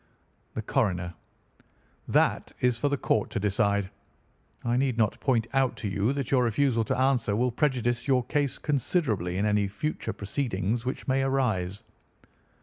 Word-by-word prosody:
"The 110 - -3
Coroner: 90 -9 0 0.9
That - - +2
is 125 -2 +1
for 145 - +1
the 140 - 0
court 110 -4 +1
to 110 - -2
decide. 100 -1 +1 0.7
I 120 0 +1
need 130 -2 +1
not 110 -3 +1
point 120 -5 +1
out 135 -2 +2
to 105 - -4
you 100 +4 +1
that 140 -3 -3
your 125 -2 +4
refusal 120 0 +2
to - - -1
answer 130 -5 +2
will 125 +3 +1
prejudice 120 -3 0
your 130 -2 +3
case 145 -2 0
considerably 120 - 0
in 100 - +1
any 105 -1 +2
future 150 +10 -3
proceedings 110 0 -2
which 130 - -4
may 135 0 +2
arise. 110 -9 0
120 Hz, 155 wpm, -27 LUFS, 105-135 Hz, 0.9 s, your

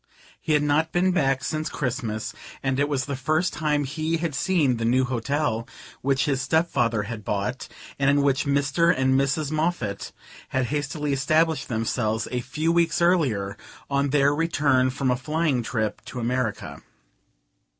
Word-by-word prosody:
He 155 - 0
had 150 -1 +3
not 150 +2 +1
been 185 +1 +2
back 135 -6 +1
since 155 0 -2
Christmas, 120 -5 -3 0.3
and 135 0 0
it 145 +1 +1
was 135 -3 0
the 140 - -3
first 155 +6 0
time 150 -1 0
he 155 +4 -1
had 165 -2 -2
seen 150 -4 +2
the 115 - -3
new 125 +3 +3
hotel 125 -1 -1 0.3
which 135 0 +1
his 135 -3 0
step 160 +6 +1
father 115 -3 +1
had 110 0 -6
bought, 105 +6 -2 0.3
and 135 0 +3
in 140 0 +3
which 140 +1 +2
Mr. 145 +4 +3
and 130 0 +2
Mrs. 140 +3 +1
Moffatt 155 - -2 0.4
had 130 -1 0
hastily 145 0 -1
established 155 +4 +1
themselves, 110 -1 -1
a 125 -1 -1
few 155 +7 -1
weeks 170 -2 +2
earlier, 135 - +2 0.4
on 140 0 +1
their 140 0 +3
return 145 -5 +2
from 130 0 0
a - - +2
flying 150 0 0
trip 110 -2 -2
to 125 - -6
America. 120 -2 -2
140 Hz, 165 wpm, -25 LUFS, 125-155 Hz, 0.4 s, had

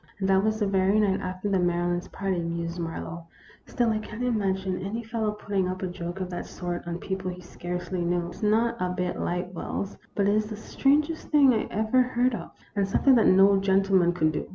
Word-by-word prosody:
" - - -32
And 190 - 0
that 190 0 +4
was 215 0 0
the 210 - +2
very 195 +1 +2
night 200 -3 +2
after 185 +2 -4
the 195 -2 +2
Mary 175 0 +1
lands' 175 +1 -2
party," 190 -2 -2
mused 170 +1 -3
Marlowe. 165 0 -5 0.2
" - - -25
Still 240 -2 +1
I 215 - 0
can't 215 +2 -6
im 240 -3 +1
agine 190 -2 -1
any 220 +4 -3
fellow 225 -1 -2
putting 200 -3 -2
up 185 +1 -4
a - - 0
joke 175 0 -6
of 185 -1 -4
that 175 - -5
sort 175 -1 -5
on 170 0 -3
people 190 0 -4
he 180 0 -6
scarcely 180 0 -5
knew. 175 0 0
It - - -9
's - - -13
not 225 +2 +2
a 180 - +1
bit 180 0 -2
like 180 +1 -2
Wells; 195 +3 -4 0.2
but 200 -1 +2
it 205 - +3
is 215 0 +1
the 215 - -5
strangest 295 +8 +1
thing 280 -4 +6
I 220 - 0
ever 220 +5 +2
heard 250 0 +1
of, 175 -7 -5 0.3
and 200 -1 +1
something 265 +7 +4
that 235 - +5
no 195 +1 +6
gentleman 195 -2 +3
could 155 -3 +1
do. - - -4
190 Hz, 240 wpm, -26 LUFS, 180-215 Hz, 0.3 s, thing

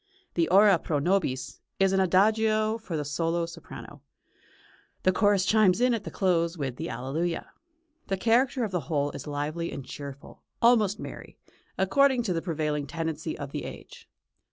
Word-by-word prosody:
The 170 -2 +1
"Ora 195 0 +6
pro 155 - -1
nobis" 140 -6 -1 0.2
is 195 0 +3
an 195 - +3
Adagio 215 +4 +3
for 180 -7 -5
the 150 - -3
solo 165 +3 -1
soprano; 165 - -11 1.0
the 185 - +4
chorus 200 0 +3
chimes 210 -2 +4
in 250 0 +3
at 225 -3 -3
the - - -4
close 175 -3 0
with 135 -4 -4
the - - -4
Alleluia. 145 +8 -3 0.6
The 195 - -1
character 240 +5 +2
of 215 - -2
the 170 -8 -3
whole 145 -2 0
is - - -8
lively 150 +3 -3
and 135 - -7
cheerful, 140 -1 -9 0.2
almost 220 -4 +4
merry, - - -9 0.4
according 255 +6 +3
to 195 -6 -1
the 165 - -1
prevailing 150 -4 -2
tendency 160 0 -4
of 140 -2 -6
the - - -4
age. - - -10
175 Hz, 165 wpm, -27 LUFS, 150-210 Hz, 1.0 s, Ora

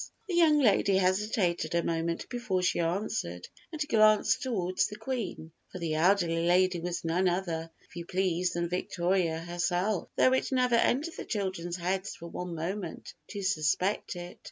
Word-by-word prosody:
The 370 - -3
young 330 -3 +5
lady 200 -7 +4
hesitated 185 -2 +1
a 170 - +2
moment 165 0 -2
before 235 -7 -2
she 180 - +1
answered, 170 - -2 0.2
and 310 -2 -3
glanced 215 -1 +4
toward 185 -8 -2
the 210 - -7
Queen, 220 -11 -4 0.2
for - - -7
the 165 -3 -2
elderly 170 0 +2
lady 180 0 +3
was 175 0 -4
none 180 +3 +2
other, 170 -3 -2 0.2
if - - -20
you 170 -1 -6
please, 180 -1 0
than 170 0 -1
Victoria 180 -1 0
herself, 175 +3 -1
though 255 - +4
it 260 - 0
never 250 -2 +2
entered 275 +7 +2
the - - -6
children's 185 -4 -3
heads 185 +2 -2
for 170 - -11
one 175 0 -5
moment 175 +2 -5
to 205 -1 -6
suspect 185 +2 0
it. 175 0 -8
185 Hz, 165 wpm, -29 LUFS, 170-210 Hz, 0.2 s, young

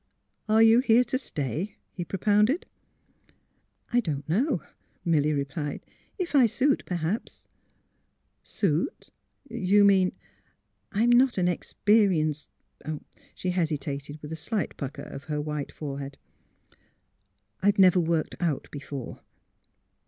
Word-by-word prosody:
" - - -34
Are 220 +1 +6
you 225 +1 +7
here 250 -1 +5
to 255 +1 -2
stay? 155 - -4
'* - - -48
he 175 - -4
propounded. 210 - +2 0.4
* - - -37
' - - -31
I 245 - +5
don 150 - -2
't 140 - -19
know, 220 - +1
' - - -42
' - - -41
Milly 155 -3 +3
replied. 145 +1 -3 0.2
" - - -38
If 340 - -13
I 265 -5 +6
suit, 270 +6 +1
per 180 - -2
haps 175 +6 -3 0.3
" - - -45
'' - - -48
Suit? 175 - -1 0.4
You 205 -4 +3
mean 190 -2 +4 0.4
" - - -47 0.3
"I'm 225 +4 +3
not 245 0 +4
an 180 -1 +2
experienced 175 -5 +1 0.5
" - - -18
She 185 - -2
hesitated, 150 -4 -2
with 150 - -7
a - - -3
slight 195 +5 -3
pucker 140 -1 -6
of 140 - -9
her 150 -1 -2
white 150 -1 -4
forehead. 140 -2 -6 0.9
" 100 +1 -46
I've 205 +1 +3
never 185 -2 +6
worked 165 -2 0
out 165 -6 -1
before." 140 -3 -7
175 Hz, 155 wpm, -27 LUFS, 145-215 Hz, 0.9 s, you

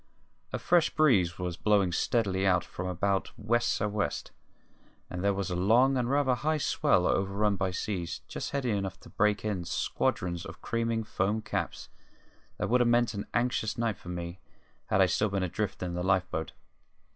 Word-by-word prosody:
A - - -1
fresh 175 -2 +3
breeze 105 - +3
was 90 -2 -3
blowing 100 -4 +3
steadily 95 0 +1
out 90 -3 +3
from 90 - -5
about 95 +2 0
west 120 +3 +1
sou' 105 - 0
west, 105 0 -2 0.8
and 90 +1 -4
there 100 - +3
was 95 -1 -2
a - - -1
long 115 +9 +4
and 125 -2 0
rather 140 -1 +3
high 155 +5 0
swell, 95 -9 +2
overrun 100 +2 +1
by 95 -1 0
seas 90 -1 -3
just - - -4
heavy 135 -4 -1
enough 95 -2 -2
to - - -14
break 105 0 +1
in 100 -5 -1
squadrons 85 +1 -1
of - - -9
creaming 115 -1 -1
foam 105 +1 0
caps - - -3 0.7
that - - -1
would 125 +1 +3
have 120 - +3
meant 120 -1 +3
an 100 -1 -5
anxious 120 -3 0
night 115 -4 0
for 90 - -10
me 85 0 -5 0.5
had 95 - +3
I - - +7
still 100 +4 +1
been 100 -1 -1
adrift 90 +2 -2
in 90 -1 -3
the 90 - -2
life 95 0 +2
boat. 80 - -3
100 Hz, 185 wpm, -29 LUFS, 90-115 Hz, 0.8 s, I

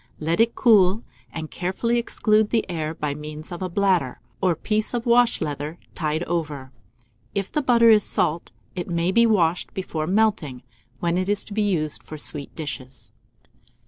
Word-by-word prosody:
Let 165 +4 -1
it 230 +1 +3
cool, 210 -3 +4 0.3
and 160 -1 -6
carefully 230 +7 -1
exclude 215 -2 +2
the 230 - 0
air 160 -3 -3
by 150 -2 -2
means 150 +2 -8
of 175 - -6
a 185 - -2
bladder, 180 -8 +1 0.2
or 180 -3 +2
piece 215 +7 -1
of 235 - -2
wash 240 0 +3
leather, 150 +2 -4 0.2
tied 155 0 -1
over. 150 -6 -3 0.6
If 195 -1 -2
the 300 - 0
butter 235 -4 +5
is 210 -2 +5
salt, 170 -3 -1 0.2
it 175 -2 -4
may 170 +1 0
be 235 +3 +5
washed 175 -6 +1
before 160 -5 -3
melting, 185 - +1 0.4
when 170 +1 +1
it 185 +1 -2
is 205 -1 +1
to 205 - -9
be 215 - 0
used 165 -8 0
for 155 - -9
sweet 145 -1 -1
dishes. 130 -4 -7
175 Hz, 175 wpm, -23 LUFS, 155-215 Hz, 0.6 s, butter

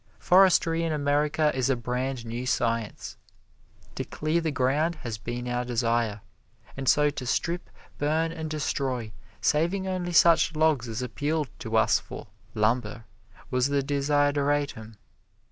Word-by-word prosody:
Forestry 175 -3 +4
in 165 -1 -1
America 150 +1 +1
is 130 0 0
a 135 - +3
brand 125 +1 -3
new 120 +2 -4
science. 115 -3 -2 0.8
To - - -3
clear 155 +2 -1
the 165 - -1
ground 145 +5 +1
has 115 -3 -5
been 120 +2 -5
our 125 0 -1
desire, 115 -3 0 0.5
and 135 -1 -1
so 150 0 +4
to 130 - -6
strip, 170 +7 -1 0.3
burn 160 +3 +1
and 160 -1 -5
destroy, 130 -6 -2 0.3
saving 175 +6 +1
only 180 -2 -2
such 165 -1 +5
logs 155 -6 +2
as 115 +2 -4
appealed 145 +5 -2
to - - -1
us - - +4
for - - -9 0.3
"lumber," 115 +1 0 0.5
was 125 0 +2
the 140 -1 +1
desideratum. 145 -4 0
140 Hz, 140 wpm, -27 LUFS, 120-155 Hz, 0.8 s, such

